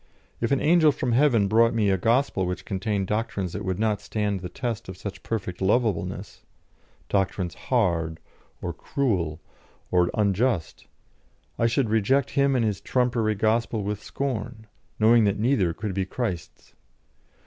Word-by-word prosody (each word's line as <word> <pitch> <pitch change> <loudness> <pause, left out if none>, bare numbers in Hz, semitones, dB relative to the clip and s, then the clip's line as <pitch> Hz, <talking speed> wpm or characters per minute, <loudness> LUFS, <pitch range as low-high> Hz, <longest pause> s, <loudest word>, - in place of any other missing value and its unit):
If 115 +2 -1
an 140 - +3
angel 160 -1 +5
from 125 -3 -2
heaven 120 -5 +4
brought 115 +3 +4
me 105 -3 +2
a 95 - +2
gospel 115 -3 +1
which 90 +1 -4
contained 100 0 -1
doctrines 105 -3 -2
that 105 - -4
would 95 -2 -2
not 105 -1 0
stand 105 -2 -2
the 90 0 -6
test 115 +1 -4
of 95 - -7
such 100 0 -7
perfect 95 -6 -4
lovableness 105 -2 0 0.7
doctrines 95 -2 0
hard, 80 -2 0 0.4
or - - -2
cruel, 90 - -1 0.5
or 90 -1 +3
unjust 105 -2 0 0.7
I 115 - +4
should 115 -1 0
reject 115 +5 +2
him 140 -1 +2
and 120 -3 +2
his 100 -2 -1
trumpery 120 -2 +1
gospel 110 +1 0
with 105 +1 -3
scorn, 120 -4 -4 0.3
knowing 110 +1 +5
that 100 - +1
neither 105 -6 +2
could 100 +4 -4
be 95 0 -1
Christ's. 95 -7 -5
105 Hz, 150 wpm, -25 LUFS, 95-120 Hz, 0.7 s, angel